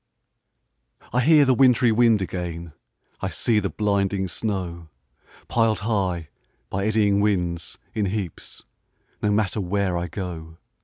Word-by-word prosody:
I 125 - +3
hear 150 +1 +6
the 130 - +4
wintry 125 -2 +4
wind 110 -3 +4
again, 85 -3 -5 0.5
I - - -1
see 115 -3 +1
the 100 -2 -2
blinding 100 -2 0
snow, 90 -5 -4 0.6
Pil'd 115 -3 +1
high, 95 -7 -1 0.4
by 100 +2 -1
eddying 105 -2 +3
winds, 90 -5 -1 0.2
in 105 -2 0
heaps, 95 -4 -5 0.6
No 105 - +1
matter 105 0 0
where 95 0 0
I 85 - -3
go. 80 -3 -7
100 Hz, 125 wpm, -24 LUFS, 90-110 Hz, 0.6 s, hear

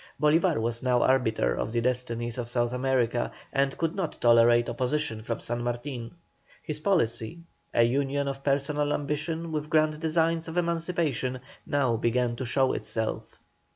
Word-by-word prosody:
Bolívar 155 - +3
was 115 +1 -2
now 125 -1 +2
arbiter 110 - +2
of 110 - -3
the 120 - 0
destinies 120 -1 -2
of 120 -1 -4
South 120 0 0
America, 125 -2 0 0.2
and 135 0 +1
could 165 -1 0
not 185 -5 -3
tolerate 120 0 +5
opposition 125 -1 -1
from 115 +1 -4
San 120 0 -3
Martin. 120 +2 -4 0.5
His 150 -1 -4
policy, 155 - 0 0.3
a 120 - +4
union 140 +3 +1
of 135 0 -4
personal 145 +1 +1
ambition 155 +3 -3
with 150 -1 -3
grand 155 -1 +2
designs 165 0 +1
of 165 +2 -5
emancipation, 165 -7 -1 0.3
now 130 -5 +1
began 120 +1 +1
to 130 - -3
show 130 +2 +2
itself. 110 -1 -4
130 Hz, 155 wpm, -27 LUFS, 120-155 Hz, 0.5 s, tolerate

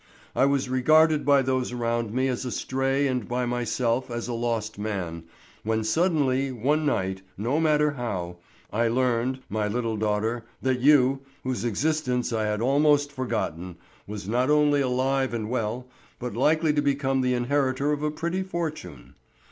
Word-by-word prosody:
I 135 - +4
was 140 -1 +1
regarded 155 +4 +4
by 140 -1 +5
those 130 -1 -1
around 115 -2 -1
me 130 +3 +1
as 125 -1 -2
a 125 - -3
stray 135 +3 0
and 125 -4 -1
by 125 +1 -1
myself 120 +1 -1
as 120 -1 -4
a 120 - -3
lost 115 -3 -2
man, 90 -6 -4 0.4
when 110 0 -1
suddenly 135 -1 +1
one 145 +6 0
night, 95 -7 -1 0.2
no 120 +9 0
matter 150 -2 +3
how, 95 -10 -4 0.4
I 115 +2 +2
learned, 125 +1 0
my 105 0 -1
little 115 0 -2
daughter, 110 +2 -1 0.2
that 130 -1 0
you, 135 -1 +4 0.2
whose 130 -5 -2
existence 125 0 0
I 110 -1 0
had 105 0 -1
almost 145 +2 +3
forgotten, 90 - -3 0.3
was 105 -2 -6
not 125 +5 +1
only 150 -1 +4
alive 130 0 0
and 110 -1 -4
well, 125 +1 -2 0.3
but 125 -2 -5
likely 155 +5 +3
to 145 - +2
become 135 -2 +1
the 125 0 +1
inheritor 135 +2 0
of 150 -1 -1
a 150 - 0
pretty 170 +5 -2
fortune. 155 - -5
125 Hz, 165 wpm, -26 LUFS, 115-140 Hz, 0.4 s, by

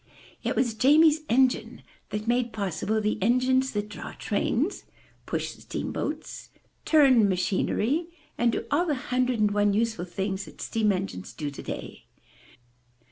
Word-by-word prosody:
It - - -1
was 235 -3 +1
Jamie's 300 +6 +5
engine 260 +2 +2 0.3
that 210 0 -4
made 240 0 +1
possible 200 +2 -1
the 210 -2 -1
engines 255 +4 +2
that 205 0 -2
draw 210 - -8
trains, 260 - -1 0.4
push - - -2
steam - - -5
boats, - - -5 0.4
turn 265 -9 +5
machinery, 210 - 0 0.3
and 240 0 +2
do - - -3
all 340 +5 +2
the 300 - +1
hundred 255 -2 0
and 210 -1 +3
one 205 0 +2
useful 220 -3 0
things 190 +2 -3
that - - -15
steam 220 -2 +1
engines 185 - -4
do 145 -2 -4
today. 140 - -7
225 Hz, 140 wpm, -27 LUFS, 205-260 Hz, 0.4 s, Jamie's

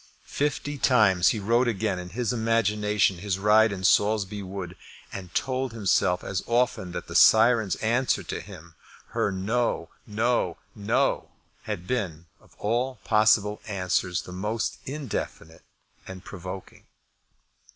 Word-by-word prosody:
Fifty 145 0 -2
times 100 -9 +4
he - - +3
rode 115 +5 +2
again 105 -4 -1
in 90 0 -7
his 120 +4 -2
imagination 105 -4 +1
his 100 0 -2
ride 105 +2 +4
in 95 -1 -5
Saulsby 105 +1 +2
Wood, 95 -2 -6 0.4
and 95 -2 -6
he 85 - -23
told 130 -1 -1
himself 95 -4 +1
as 95 -1 -2
often 120 -6 0
that 90 - -5
the - - -9
syren's 110 -3 +5
answer 120 +4 +1
to - - -5
him, 80 +1 -12 0.4
her 100 - 0
no, 100 -1 -1 0.2
no, 110 -4 0 0.2
no, 115 +6 0 0.4
had 100 -5 -4
been, 90 -9 -3
of - - -24
all 120 +5 -1
possible 105 -1 +3
answers, 90 -3 -1
the - - -10
most 105 +5 -3
indefinite 130 - -5 0.5
and 95 0 -9
provoking. 95 0 -9
105 Hz, 135 wpm, -26 LUFS, 95-115 Hz, 0.5 s, syren's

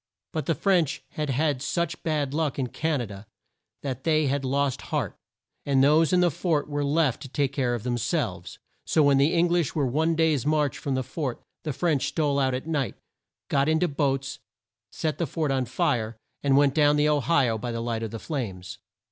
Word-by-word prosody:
But - - -3
the - - +2
French 175 -9 +1
had 150 +1 -3
had 140 0 +1
such 170 +2 -2
bad 150 -4 -1
luck 155 -2 -1
in 135 - 0
Can 155 -1 -1
a - - -2
da, 100 -1 -10 0.6
that 130 -2 -4
they 155 -2 +2
had 140 0 0
lost 135 0 0
heart, - - -1 0.5
and 135 -2 +3
those 155 +3 +4
in 180 -1 +4
the 175 -1 +3
fort 155 -1 0
were 145 -1 -2
left 145 -3 +1
to 140 - -7
take 140 0 0
care 125 -4 0
of 115 - -6
them 120 -1 -1
selves. 105 - -2 0.3
So 155 - +2
when 140 -1 +4
the 145 +5 +3
Eng 170 +1 +3
lish 170 -4 +1
were 145 -3 +1
one 160 +6 +1
day's 160 -5 +2
march 150 -3 +1
from 140 -2 -2
the 130 - 0
fort, 130 0 -4 0.2
the 155 - -3
French 145 0 0
stole 145 -3 0
out 130 -2 +1
at 130 - -4
night, 150 -6 -1 0.5
got 140 +2 +2
in 160 0 +3
to 180 - +3
boats, 135 -3 -1 0.5
set 155 -2 -2
the 170 - 0
fort 150 +1 -1
on 130 -1 +1
fire, 115 -2 -1 0.2
and 140 -1 +3
went 140 -1 +4
down 145 -1 +4
the 150 0 +3
O 150 -1 +3
hi 140 -2 +3
o 110 -1 -1
by 120 +2 -4
the 115 - -3
light 115 -1 -2
of 115 - -3
the 115 - -6
flames. 100 - -5
140 Hz, 220 wpm, -26 LUFS, 130-155 Hz, 0.6 s, those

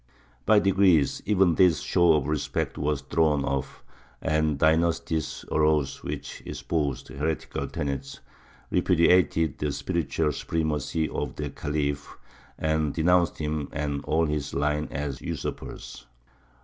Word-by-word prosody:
By 110 - +6
degrees 95 -7 +3
even 95 -4 +4
this 85 -3 +4
show 85 -2 +4
of 75 -3 +1
respect 70 -2 -2
was 75 -1 -1
thrown 75 -3 +1
off, 70 -1 -3 0.4
and 80 -2 +1
dynasties 80 +1 +1
arose 75 -3 +1
which - - -6
espoused 75 -6 -3
heretical 75 +5 -3
tenets, 70 -1 -4 0.5
repudiated 85 -3 +3
the 75 -1 -1
spiritual 75 +1 -1
supremacy 80 0 -1
of - - -4
the 75 -2 -4
Khalif, 75 -1 -3 0.4
and 80 -2 0
denounced 85 +1 +3
him 75 -2 -3
and 75 -1 -3
all 80 +1 +2
his 75 -2 -3
line 75 +2 0
as 70 -2 -4
usurpers. - - -6
75 Hz, 120 wpm, -26 LUFS, 70-80 Hz, 0.5 s, By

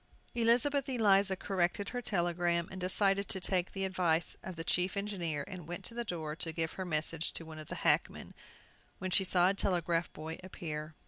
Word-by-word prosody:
Elizabeth 245 +4 +2
Eliza 200 -6 +4
corrected 190 +1 -1
her 245 - -3
telegram, 175 -4 +1
and 190 -1 -7
decided 195 +2 +3
to 190 - 0
take 185 -1 0
the 195 -1 -2
advice 175 -3 +1
of 185 - -7
the 165 - -5
chief 180 +3 +1
engineer 175 -8 -2
and 180 -4 -8
went 175 +1 -6
to - - -5
the 240 0 -2
door 160 -7 -4
to 165 0 0
give 160 0 -1
her 190 - -4
message 160 0 0
to 165 - -5
one 160 -1 -9
of 155 - -9
the - - -5
hackmen, - - +1 0.6
when 185 0 -4
she 190 - +4
saw 180 -1 +4
a - - +2
telegraph 175 -3 0
boy 160 +1 -7
appear. 155 -4 -6
180 Hz, 195 wpm, -33 LUFS, 165-195 Hz, 0.6 s, Eliza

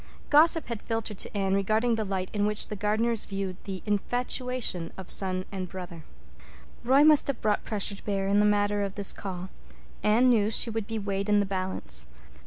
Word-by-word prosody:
Gossip 320 +2 +5
had 235 -3 -5
filtered 225 -3 -4
to - - -6
Anne 195 -1 0
regarding 215 +4 +1
the 225 -1 -1
light 190 -2 -3
in 205 -1 +1
which 210 0 0
the 210 - -4
Gardners 215 +3 +3
viewed 195 -2 -4
the 190 -2 -6
"infatuation" 245 -3 -1
of 190 -1 -6
son 185 -1 +1
and 185 -2 -5
brother. 175 -3 -8 0.8
Roy 265 +4 +5
must 305 -1 +5
have 275 -4 -2
brought 210 -1 0
pressure 205 -2 -2
to 200 - -11
bear 195 -2 -1
in 200 +1 +3
the - - +4
matter 205 0 +2
of 200 -1 -3
this 200 -1 +2
call. 185 -1 -6 0.5
Anne 225 +4 +4
knew 220 -4 +3
she 225 +1 +1
would 220 -2 -3
be 225 - -3
weighed 200 -1 -3
in 210 0 +4
the 200 - +1
balance. 185 - -3
205 Hz, 195 wpm, -27 LUFS, 195-225 Hz, 0.8 s, Gossip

